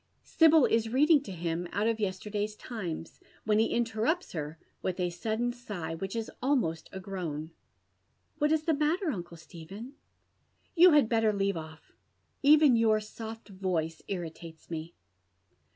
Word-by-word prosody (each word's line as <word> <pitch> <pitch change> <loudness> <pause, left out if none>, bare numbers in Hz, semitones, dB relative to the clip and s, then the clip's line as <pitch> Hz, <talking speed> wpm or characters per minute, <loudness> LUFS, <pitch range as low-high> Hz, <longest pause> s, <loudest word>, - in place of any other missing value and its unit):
Sibyl 320 -4 +5
is 225 0 +1
reading 295 +5 +5
to 260 - -8
him 170 0 -3
out 205 - 0
of 225 -1 +1
yesterday's 210 +1 -2
Times, 180 -9 -6 0.2
when 215 0 +2
ho 225 - +4
interrupts 235 +9 0
her 155 -1 -5 0.2
with 185 0 -2
a 180 -1 0
sudden 220 +7 -1
sigh, 195 -10 -5
wliich 195 +5 -5
is 225 -1 -3
almost 245 - 0
a 190 - -6
groan. 170 -5 -5 0.4
" - - -45
What 295 0 +2
is 315 0 +1
Ae 325 - +4
matter, 310 +4 +1
uncle 175 -6 -6
Stephen? 185 - -10 0.3
" - - -44
" - - -43
You 350 0 +8
had 295 -6 +5
better 225 -1 +3
leave 200 -1 0
off, 160 -1 -9 0.3
— - - -45
even 300 -4 +7
your 220 -2 +4
soft 220 +1 -9
voice 180 -5 -2
irritates 165 -3 -7
me." 165 +1 -5
210 Hz, 165 wpm, -30 LUFS, 170-240 Hz, 0.4 s, You